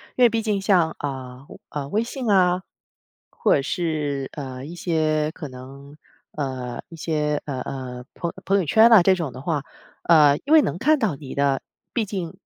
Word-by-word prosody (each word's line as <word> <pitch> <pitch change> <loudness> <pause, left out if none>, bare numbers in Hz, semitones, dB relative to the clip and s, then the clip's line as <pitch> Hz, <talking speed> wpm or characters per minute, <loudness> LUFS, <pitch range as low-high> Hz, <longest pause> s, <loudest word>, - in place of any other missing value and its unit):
因 250 - +3
为 240 - +8
毕 225 0 -1
竟 210 -3 -1
像， 180 -5 +2
啊， 130 -2 -6 0.2
啊， 145 -2 -5
微 215 +6 +1
信 245 -1 -4
啊， 180 -1 +3 0.7
或 - - +2
者 - - 0
是， 150 -4 -2
呃， 130 -2 -6
一 165 - -8
些 155 -3 0
可 150 -5 -8
能， 135 +3 -12 0.3
呃， 130 -4 -4
一 165 - -12
些， 150 -2 -1
呃 135 -3 -4
呃， 125 -2 -6
朋 170 - -3
友 - - -13
朋 200 +1 +3
友 190 - +1
圈 220 +9 +6
啊， 220 -7 +8
这 190 0 +5
种 160 -8 -4
的 130 - -9
话， 150 -2 -1 0.4
呃， 150 -4 +6
因 300 - +2
为 315 - +8
能 - - -2
看 305 +3 +3
到 210 - -1
你 135 -2 -9
的 140 -1 +1 0.3
毕 230 -4 0
竟 185 -5 -5
155 Hz, 205 characters per minute, -23 LUFS, 140-190 Hz, 0.7 s, 为